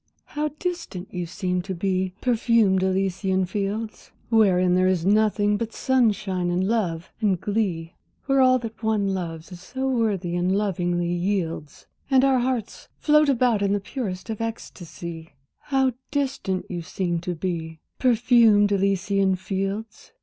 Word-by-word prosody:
How 300 +1 -2
distant 335 - -5
you 180 -2 -3
seem 180 0 -2
to 190 +1 -5
be, 185 0 -1
perfumed 230 -5 +3
Elysian 190 0 0
fields! 205 +3 -4 0.2
Wherein 185 -5 +4
there 185 +1 +3
is 180 -3 +1
nothing 210 0 +3
but 225 +1 -4
sunshine 205 -8 +1
and 180 +2 0
love 185 -7 -1
and 195 -5 +2
glee; 185 -6 -2 0.3
Where 270 0 +3
all 255 0 +5
that 230 -2 -7
one 210 -3 +1
loves 165 -2 -5
is 180 -1 -10
so 260 +8 -4
worthy, 210 -9 0
and 180 +2 +1
lovingly 175 -4 0
yields, 175 -5 -3 0.2
And 265 -1 +4
our 265 -2 +3
hearts 245 -3 -3
float 300 -1 +4
about 245 -5 +2
in 200 0 +2
the 205 - +1
purest 200 -2 -5
of 220 - -5
ecstasy, 170 -7 -7 0.3
How 265 -2 +2 0.2
distant 265 -10 -2
you 175 -2 -4
seem 175 +1 -2
to 180 +1 -4
be, 160 -2 -4 0.2
perfumed 230 -4 +4
Elysian 195 0 +1
fields! 195 +4 -4
195 Hz, 145 wpm, -24 LUFS, 180-225 Hz, 0.3 s, all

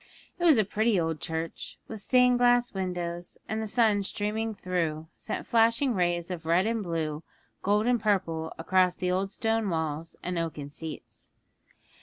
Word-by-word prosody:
It 350 - 0
was 315 -6 +7
a 215 - +5
pretty 215 0 +2
old 160 -2 -1
church, 160 0 -5
with 220 -2 -7
stained 250 +1 +4
glass 245 0 +4
windows; 175 -2 -4
and 220 0 -2
the 220 - -3
sun 215 -2 +3
streaming 215 +3 -2
through 165 -4 -2
sent - - -5
flashing 230 +3 +3
rays 175 -2 0
of 175 -2 -5
red 175 +4 +3
and 225 0 0
blue, 160 -4 -2 0.4
golden 210 +3 +2
and 245 -2 +2
purple, 175 -7 0
across 180 +2 +2
the 180 0 -1
old 190 +2 0
stone 225 +1 0
walls 160 -1 -3
and 180 -1 -2
oaken 150 -4 -4
seats. 160 +1 -8
185 Hz, 165 wpm, -28 LUFS, 165-220 Hz, 0.4 s, was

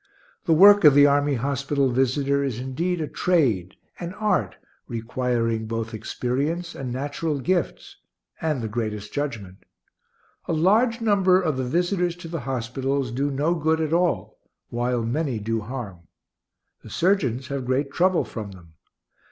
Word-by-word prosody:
The 165 - +3
work 200 +5 +8
of 150 -3 +8
the 145 0 +8
army 145 0 +3
hospital 140 +1 0
visitor 135 +2 +1
is 130 -5 -2
indeed 160 +7 -2
a 155 - -2
trade, 125 - +1 0.2
an 175 +1 -6
art, 215 0 0 0.3
requiring 115 -1 -1
both 115 0 -4
experience 145 +10 -2
and 130 -2 -5
natural 145 +3 -2
gifts, 175 +5 -2 0.4
and 150 -6 -1
the - - -2
greatest 105 -2 -4
judgment. 115 -11 -4 0.9
A - - 0
large 220 +9 +3
number 195 -4 +4
of 160 -6 0
the 130 - -2
visitors 175 +4 0
to 175 -1 -10
the 165 0 -4
hospitals 130 +1 -2
do 140 +4 -1
no 145 +5 0
good 160 -1 +1
at 160 0 -1
all, 125 - 0 0.3
while 120 0 -1
many 130 +2 -1
do 110 +2 -2
harm. 105 -7 -7 0.7
The - - -12
surgeons 135 - 0
have 140 -3 -4
great 135 +2 0
trouble 185 0 +2
from 105 -4 -7
them. 85 -3 -16
140 Hz, 150 wpm, -24 LUFS, 120-165 Hz, 0.9 s, work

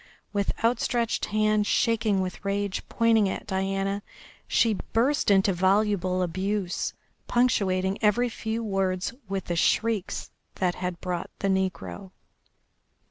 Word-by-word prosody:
With 200 -1 +1
outstretched 235 0 +1
hand 215 0 +2
shaking 220 -4 +2
with 185 +1 -5
rage, 200 -1 -1
pointing 225 -3 +3
at - - -4
Diana, 195 +1 -1 0.5
she 225 -2 +3 0.2
burst 255 +5 +2
into 195 -1 +4
voluble 190 0 +2
abuse, 185 +2 -2 0.3
punctuating 195 -6 +1
every 220 +4 +3
few 225 0 -3
words 195 -2 -1 0.2
with 195 -1 -2
the 175 - -2
shrieks 215 +3 0 0.2
that 180 -2 +1
had 180 -1 -4
brought 180 -2 -3
the 195 - -1
negro. 190 0 -2
195 Hz, 120 wpm, -26 LUFS, 185-220 Hz, 0.5 s, into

